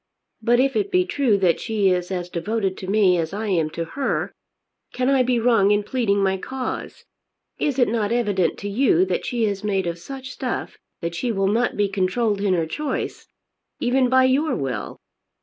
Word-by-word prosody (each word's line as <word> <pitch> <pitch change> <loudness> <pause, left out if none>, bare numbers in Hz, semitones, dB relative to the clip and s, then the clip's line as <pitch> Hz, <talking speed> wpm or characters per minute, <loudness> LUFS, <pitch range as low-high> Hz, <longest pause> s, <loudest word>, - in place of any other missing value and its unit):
But 240 +2 +3
if 270 +1 +2
it 405 -1 0
be 365 -1 +3
true 265 - +2
that 180 -4 +2
she 210 -4 +1
is 180 -1 -1
as 180 -2 -3
devoted 190 +3 -2
to 185 - -7
me 195 -3 +3
as 160 +2 -3
I 215 +1 -3
am 165 -5 +1
to 165 +1 -4
her, 195 - -2 0.6
can 255 +1 0
I 270 -1 +4
be 250 -1 +2
wrong 225 -4 +4
in 205 0 +3
pleading 205 -4 0
my 190 0 +1
cause? 260 +6 -5 0.5
Is 280 -3 0
it 245 - +4
not 215 -2 -1
evident 205 -8 +1
to 205 - -4
you 200 -4 +3
that 185 -1 -2
she 235 -2 0
is 200 -1 -2
made 195 -3 0
of 170 0 -3
such 260 +7 -8
stuff 255 -3 -4 0.2
that 170 0 -3
she 240 +8 -2
will 195 -2 +1
not 235 +4 +1
be 205 -1 +2
controlled 200 +2 0
in 195 -2 +2
her 165 -2 0
choice, 295 - -4 0.5
even 250 +1 +2
by 260 0 +5
your 275 +5 +2
will? 130 -6 -4
205 Hz, 200 wpm, -22 LUFS, 185-250 Hz, 0.6 s, by